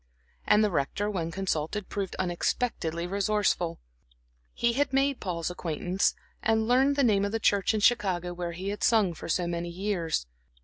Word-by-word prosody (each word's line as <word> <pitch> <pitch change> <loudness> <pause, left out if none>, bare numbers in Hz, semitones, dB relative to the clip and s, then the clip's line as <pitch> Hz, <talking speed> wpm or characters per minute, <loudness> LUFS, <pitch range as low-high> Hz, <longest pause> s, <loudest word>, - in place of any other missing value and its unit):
And 210 +1 +5
the 210 - +2
Rector, 190 +7 -1
when 170 -5 -2
consulted, 185 +1 -2
proved 195 -2 -4
unexpectedly 175 -2 -1
resourceful. 200 -3 0 0.7
He 235 0 +1
had 285 +3 +1
made 275 0 +2
Paul's 175 -3 -3
acquaintance, 180 +2 -1 0.3
and 220 0 +2
learned 265 +3 +4
the 280 - +2
name 205 -5 +3
of 200 - -1
the 225 - -1
church 205 0 +2
in 215 - 0
Chicago 185 -6 +2
where 175 -1 -4
he 185 +3 -4
had 205 - -4
sung 215 -6 +3
for 165 - -8
so 175 +2 +1
many 170 0 -3
years. 170 - -2
195 Hz, 170 wpm, -28 LUFS, 175-215 Hz, 0.7 s, And